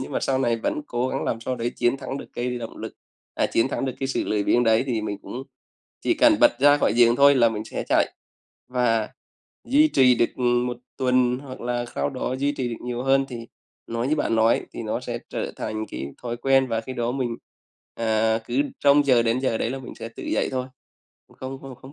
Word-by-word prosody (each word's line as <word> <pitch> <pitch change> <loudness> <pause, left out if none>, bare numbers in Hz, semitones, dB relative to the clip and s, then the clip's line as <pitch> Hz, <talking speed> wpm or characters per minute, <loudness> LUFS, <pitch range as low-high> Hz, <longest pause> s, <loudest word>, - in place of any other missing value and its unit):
nhưng 130 - -6
mà - - 0
sau 135 -1 0
này 120 -3 +1
vẫn 115 +6 -2
cố 120 +1 -1
gắng - - -2
làm 115 - -2
sao 125 +2 -3
đấy 120 0 -2
chiến 120 +2 +2
thắng 135 0 -5
được - - -8
cái 125 0 -2
động 115 -1 -7
lực - - -7 0.4
à, - - +1
chiến 115 +3 +1
thắng 135 - -2
được 130 -2 -3
cái 135 - -1
sự 135 - -1
lười 105 -1 0
biếng 120 +4 +3
đấy 115 +2 +3
thì 120 -4 -1
mình 105 -2 -4
cũng 130 - -6 0.6
chỉ - - +1
cần 305 0 +5
bật 295 - +7
ra 145 +1 +6
khỏi - - +2
giường 120 0 +5
thôi 140 +1 +7
là 120 -3 +5
mình 110 -1 -4
sẽ - - -5
chạy. - - +2 0.6
Và 120 -3 +1 0.6
duy 295 +4 +5
trì 130 - +5
được, 115 - +1
ừm, 120 -1 +2
1 125 0 -3 0.2
tuần 125 -1 +2
hoặc 130 -1 -10
là 120 0 -2
sau 70 +1 -1
đó 130 - -3
duy 140 +1 +1
trì 130 -4 -3
được 115 - -6
nhiều 125 0 -3
hơn 135 +1 +3
thì 115 -2 -7 0.4
nói 115 +2 -2
như 155 - +2
bạn 115 - 0
nói 110 +1 +3
thì - - -6
nó - - -2
sẽ - - -4
trở - - -3
thành 110 0 -4
cái 70 - -6 0.2
thói 120 -1 -3
quen 135 +2 +3
và 115 -1 0
khi 120 +3 -7
đó 120 -1 -1
mình, 125 -3 -2 0.6
à, 110 0 +1
cứ 125 +3 +1 0.2
trông 145 0 +5
chờ 130 -4 +4
đến 115 +1 +1
giờ 130 -4 0
đấy 115 - -1
là 135 - -4
mình 130 - -9
sẽ 115 - -7
tự 115 - -11
dậy - - 0
thôi, 130 -1 -2 0.7
không 130 +1 -6
không 135 -1 -8
không 130 +3 -14
125 Hz, 240 wpm, -24 LUFS, 115-135 Hz, 0.7 s, bật